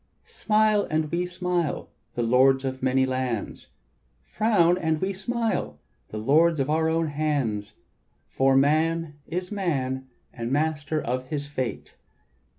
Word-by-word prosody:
"Smile 215 -1 +2
and 155 -1 0
we 175 +1 0
smile, 180 -3 -2 0.2
the 120 - 0
lords 130 +3 +4
of 130 0 -4
many 130 0 +2
lands; 130 -4 -3 0.6
Frown 175 - +3
and 160 -2 0
we 190 +3 -1
smile, 195 - -2 0.3
the 110 - -7
lords 155 +8 +3
of 135 +2 0
our 160 +1 +2
own 165 -1 0
hands; 140 -9 -1 0.5
For 135 0 +2
man 155 +2 +1
is 180 +2 -4
man 135 -10 -2 0.3
and 120 0 -4
master 155 +1 0
of 130 -1 -3
his 145 0 -3
fate. 130 -4 -5
150 Hz, 135 wpm, -25 LUFS, 130-170 Hz, 0.6 s, lords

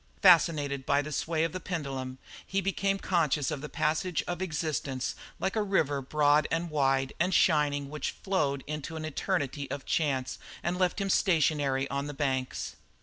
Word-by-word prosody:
Fascinated 145 -5 +5
by 140 +2 +2
the 150 - -6
sway 160 +2 0
of 165 - 0
the 185 - -4
pendulum 135 -7 -4 0.3
he 195 - -1
became 195 +1 0
conscious 160 -7 +1
of 145 -3 -3
the 150 - -6
passage 160 +3 0
of 175 0 -3
existence 150 -6 -2 0.3
like 190 +2 -1
a 220 - +2
river 155 -9 +1
broad 145 +2 +3
and 165 0 -1
wide 135 -2 +1
and 180 +3 +2
shining 145 -4 +3
which 150 0 -4
flowed 145 -8 0
on - - -28
into 150 +2 -5
an 155 0 -4
eternity 145 -3 -2
of 140 -1 -5
chance 135 -5 0 0.2
and 180 +1 -1
left 185 +2 +1
him 195 -1 0
stationary 145 -7 +2
on 140 +1 -2
the 145 - -6
banks. 130 -2 -2
150 Hz, 175 wpm, -29 LUFS, 140-175 Hz, 0.3 s, Fascinated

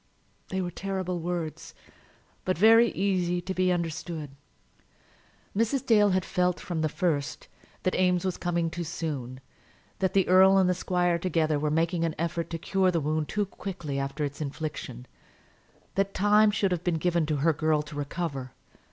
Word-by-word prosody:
They 190 0 -1
were 175 -1 -3
terrible 185 -1 -3
words, 170 -2 -4 0.7
but 185 -2 0
very 225 +4 +6
easy 180 -3 0
to 190 +2 -4
be 185 0 +2
understood. 165 -3 -3 1.2
Mrs. 230 +6 0
Dale 210 -4 +5
had 185 0 +1
felt, 180 -1 0
from 170 -3 -3
the 155 - +1
first, 150 -5 -2 0.4
that 185 - +1
Eames 180 -1 +2
was 185 -2 -1
coming 170 -1 -1
too 175 +1 -4
soon, 140 -6 -5 0.6
that 190 -1 0
the 195 -1 +3
earl 190 +1 +6
and 190 -1 +4
the 180 - +3
squire 175 -1 0
together 160 -4 +1
were 150 +1 0
making 165 +2 +1
an 165 -2 -1
effort 170 0 -2
to 165 - -3
cure 190 +3 +1
the 170 -2 +1
wound 155 0 -1
too 210 -1 0
quickly 175 -8 -5
after 140 +2 -3
its 140 +2 -6
infliction; 145 - -5 0.9
that 195 0 -1
time 210 +2 +5
should 205 -2 +1
have 175 -1 -1
been 175 -3 +1
given 170 -1 +1
to 155 - 0
her 155 +3 +2
girl 155 0 +1
to 150 +1 -11
recover. 145 -3 -4
175 Hz, 170 wpm, -27 LUFS, 155-185 Hz, 1.2 s, very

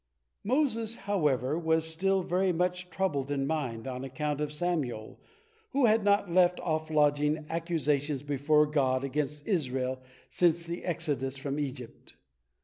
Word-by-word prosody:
Moses, 230 -2 0
however, 150 - +1
was 160 -1 +1
still 190 +4 +1
very 185 +2 +1
much 180 +1 -1
troubled 155 -7 -1
in 140 -1 0
mind, 135 -6 -2
on 130 0 -4
account 145 +2 -3
of 150 -1 -2
Samael, 150 -9 -3 0.5
who 275 -1 +4
had 220 -1 +4
not 200 -2 +2
left 180 0 +4
off 155 -1 -1
lodging 150 0 +2
accusations 150 -4 -1
before 145 +1 +3
God 135 -3 +1
against 145 +2 -3
Israel 130 - -1 0.3
since 170 -1 +2
the 170 +1 -5
exodus 145 -6 -2
from 140 +1 -3
Egypt. 130 -4 -6
150 Hz, 140 wpm, -29 LUFS, 140-180 Hz, 0.5 s, who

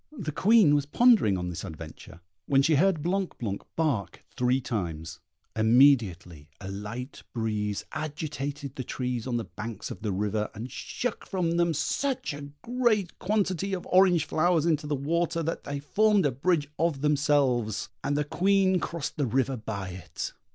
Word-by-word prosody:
The 155 -8 -3
Queen 195 0 +5
was 145 -1 +1
pondering 215 - +4
on 90 0 -3
this 85 - -5
adventure, 80 0 -10 0.3
when 135 -1 +4
she 160 - +3
heard 170 -2 +2
Blanc 185 +2 -1
blanc 100 -5 -3
bark 145 -11 -1
three 125 +1 +2
times; 85 -11 -4 0.4
immediately 110 - +3
a 95 -1 -6
light 110 +7 -6
breeze 105 -3 -2
agitated 145 -2 -4
the 130 - -3
trees 125 -1 -3
on 120 -2 0
the 115 - -2
banks 110 -1 -7
of - - -8
the 105 -2 -1
river, 105 +2 -1
and 115 +5 -6
shook 245 - -4
from 180 -4 0
them 170 -2 +2
such 270 - -1
a 145 0 -7
great 235 -7 0
quantity 195 -1 0
of 180 - -7
orange 180 -4 +5
flowers 165 0 +2
into 155 -3 +1
the 145 - 0
water, 165 +4 0
that 165 +2 -3
they 145 0 -3
formed 205 +5 +3
a 145 - +3
bridge 145 +3 +1
of 160 -4 +1
themselves, 140 -7 +1
and 145 +1 0
the 150 - +2
Queen 190 +4 +2
crossed 165 -4 -4
the 145 -3 +1
river 130 +3 +1
by 105 -4 -5
it. 90 0 -6
145 Hz, 165 wpm, -27 LUFS, 110-170 Hz, 0.4 s, Queen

